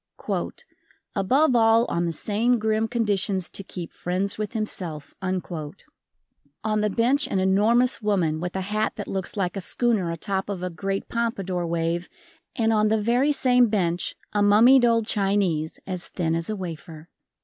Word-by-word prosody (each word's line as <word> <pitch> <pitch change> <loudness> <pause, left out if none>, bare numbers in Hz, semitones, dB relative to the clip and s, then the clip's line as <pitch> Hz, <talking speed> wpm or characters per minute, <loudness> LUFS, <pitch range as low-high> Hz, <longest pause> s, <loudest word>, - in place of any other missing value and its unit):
"Above 255 +8 +3
all 225 0 +5
on 170 -5 -1
the 170 - -1
same 225 +8 +1
grim 220 0 0
conditions 205 -5 0
to 195 - -6
keep 175 -3 -8
friends 185 +3 -2
with 215 0 -4
himself." 180 -9 -5
On 185 +1 -6
the 210 - +1
bench 250 +8 +2
an - - -1
enormous 215 +7 +3
woman 180 -7 +1
with 175 +2 -4
a 190 - -1
hat 210 +3 -1
that 205 - -6
looks 190 +2 -3
like 180 -2 -1
a 195 - -3
schooner 215 -2 0
atop 190 +4 -3
of 190 -3 -4
a 180 - -3
great 195 +3 -3
pompadour 195 -7 -2
wave 170 +1 -1 0.5
and 225 -3 +2
on 215 0 +3
the 220 +1 +2
very 245 +7 +2
same 250 -3 +4
bench 180 -5 -1 0.2
a 205 - +1
mummied 235 +6 +6
old 230 -2 +3
Chinese 195 -7 0
as 185 -2 -5
thin 165 -3 -2
as 165 +2 -1
a 215 - -1
wafer. 165 -3 -8
200 Hz, 160 wpm, -24 LUFS, 180-225 Hz, 0.5 s, mummied